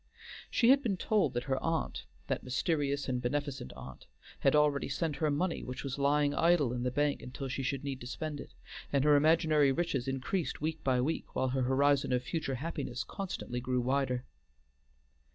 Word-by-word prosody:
She 235 Hz, -, +3 dB
had 275 Hz, +1 st, +5 dB
been 210 Hz, -8 st, -1 dB
told 190 Hz, -, +1 dB
that 120 Hz, -, 0 dB
her 130 Hz, 0 st, -1 dB
aunt 165 Hz, -1 st, -2 dB, 0.2 s
that -, -, -2 dB
mysterious 140 Hz, +2 st, 0 dB
and 125 Hz, -2 st, -1 dB
beneficent 135 Hz, -, -2 dB
aunt 65 Hz, 0 st, -11 dB, 0.3 s
had 135 Hz, -, +3 dB
already 150 Hz, -2 st, +3 dB
sent 150 Hz, +1 st, -1 dB
her 155 Hz, +1 st, +1 dB
money 165 Hz, +5 st, 0 dB
which 125 Hz, 0 st, -6 dB
was 140 Hz, 0 st, -4 dB
lying 145 Hz, +1 st, +3 dB
idle 155 Hz, -5 st, +3 dB
in 125 Hz, -, -3 dB
the 125 Hz, -, 0 dB
bank 145 Hz, +2 st, 0 dB
until 135 Hz, +2 st, -6 dB
she 135 Hz, +1 st, -3 dB
should 135 Hz, +1 st, -2 dB
need 135 Hz, -2 st, -4 dB
to 120 Hz, -, -7 dB
spend 150 Hz, +2 st, -4 dB
it, -, -, -10 dB, 0.4 s
and 140 Hz, -1 st, +2 dB
her 150 Hz, 0 st, +6 dB
imaginary 155 Hz, -1 st, +4 dB
riches 135 Hz, -4 st, -1 dB
increased 135 Hz, +7 st, -2 dB
week 155 Hz, +1 st, -3 dB
by 130 Hz, -2 st, +2 dB
week, 155 Hz, +6 st, -3 dB
while 130 Hz, -, +1 dB
her 130 Hz, +1 st, 0 dB
horizon 140 Hz, +2 st, +2 dB
of 125 Hz, 0 st, +1 dB
future 150 Hz, -2 st, -2 dB
happiness 135 Hz, -3 st, -4 dB
constantly 180 Hz, -10 st, -5 dB
grew 125 Hz, +1 st, 0 dB
wider. 130 Hz, 0 st, 0 dB
140 Hz, 190 wpm, -32 LUFS, 130-155 Hz, 0.4 s, her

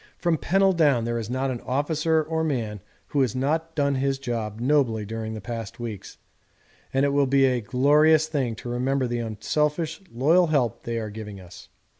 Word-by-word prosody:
From 170 Hz, -3 st, 0 dB
Pennell 195 Hz, +1 st, +3 dB
down 145 Hz, -9 st, +3 dB
there 120 Hz, 0 st, -1 dB
is 110 Hz, -1 st, -5 dB
not 130 Hz, +1 st, -1 dB
an 120 Hz, -, -5 dB
officer 155 Hz, +4 st, 0 dB
or 160 Hz, +1 st, -2 dB
man 115 Hz, -9 st, -2 dB, 0.3 s
who 145 Hz, -, +1 dB
has 130 Hz, -4 st, 0 dB
not 160 Hz, +5 st, -1 dB
done 140 Hz, -2 st, +1 dB
his 135 Hz, 0 st, 0 dB
job 115 Hz, -5 st, -4 dB
nobly 120 Hz, -5 st, +1 dB
during 110 Hz, +1 st, -5 dB
the 110 Hz, -, -6 dB
past 115 Hz, -1 st, -6 dB
weeks, 115 Hz, -5 st, -7 dB, 0.7 s
and 135 Hz, +1 st, +2 dB
it -, -, +2 dB
will 140 Hz, -1 st, +3 dB
be 135 Hz, 0 st, +4 dB
a 125 Hz, -2 st, +1 dB
glorious 150 Hz, +7 st, +4 dB
thing 135 Hz, -7 st, -2 dB
to 120 Hz, -, -8 dB
remember 130 Hz, +2 st, 0 dB
the 120 Hz, -1 st, -2 dB
unselfish 150 Hz, -, -1 dB
loyal 160 Hz, +9 st, +3 dB
help 125 Hz, -7 st, 0 dB
they 115 Hz, -1 st, -2 dB
are 110 Hz, -2 st, -4 dB
giving 105 Hz, -2 st, -8 dB
us. 90 Hz, -1 st, -13 dB
130 Hz, 190 wpm, -25 LUFS, 115-150 Hz, 0.7 s, be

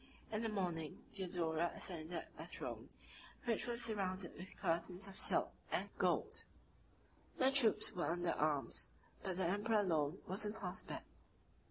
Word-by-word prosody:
In 215 Hz, 0 st, 0 dB
the 225 Hz, -, 0 dB
morning, 175 Hz, -7 st, -2 dB
Theodora 175 Hz, -3 st, 0 dB
ascended 170 Hz, -1 st, -2 dB, 0.2 s
a -, -, -5 dB
throne, -, -, -6 dB, 0.6 s
which 235 Hz, 0 st, +1 dB
was 240 Hz, 0 st, +2 dB
surrounded 190 Hz, -5 st, 0 dB
with 185 Hz, +2 st, -9 dB
curtains 180 Hz, +1 st, 0 dB
of 195 Hz, -, -6 dB
silk -, -, +4 dB, 0.2 s
and -, -, 0 dB
gold: -, -, +2 dB, 0.9 s
the 265 Hz, +1 st, +5 dB
troops 225 Hz, -6 st, +5 dB
were 175 Hz, -, -1 dB
under 175 Hz, 0 st, +1 dB
arms; 150 Hz, -2 st, +1 dB, 0.3 s
but 185 Hz, -2 st, -2 dB
the 190 Hz, -, +2 dB
emperor 205 Hz, +5 st, +2 dB
alone 160 Hz, -3 st, +1 dB
was 190 Hz, +4 st, +1 dB
on 210 Hz, 0 st, -1 dB
horseback. 190 Hz, -4 st, -4 dB
185 Hz, 145 wpm, -40 LUFS, 170-210 Hz, 0.9 s, the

